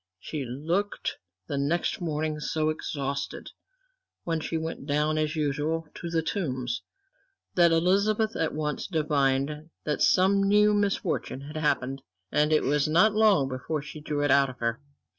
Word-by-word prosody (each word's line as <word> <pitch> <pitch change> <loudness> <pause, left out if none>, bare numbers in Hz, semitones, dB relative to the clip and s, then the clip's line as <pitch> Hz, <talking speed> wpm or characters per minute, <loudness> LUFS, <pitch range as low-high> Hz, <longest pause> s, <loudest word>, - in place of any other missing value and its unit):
She 150 +6 -4
looked 165 +11 -2 0.3
the 140 - -2
next 165 +6 0
morning 155 -2 -2
so 155 +1 0
exhausted, 140 -2 -4 0.7
when 165 -1 -1
she 165 +1 -2
went 160 -3 -5
down 150 +1 +1
as 155 +1 0
usual 155 +2 -1
to 170 - -6
The 165 -1 0
Tombs, 130 - -2 0.7
that 170 -2 +5
Elizabeth 200 +6 +2
at 160 - 0
once 150 -2 -2
divined 150 -2 0
that 150 - -2
some 195 +2 +4
new 210 +1 +4
misfortune 200 -9 -1
had 145 +3 -9
happened, 135 -3 0 0.3
and 150 +1 +2
it 155 - +4
was 145 +1 +2
not 175 +8 +4
long 210 -10 +4
before 135 +3 -3
she 150 0 -9
drew 145 -1 -2
it 145 - +2
out 140 -1 +5
of 130 - -10
her. 115 +2 -2
155 Hz, 155 wpm, -27 LUFS, 140-170 Hz, 0.7 s, that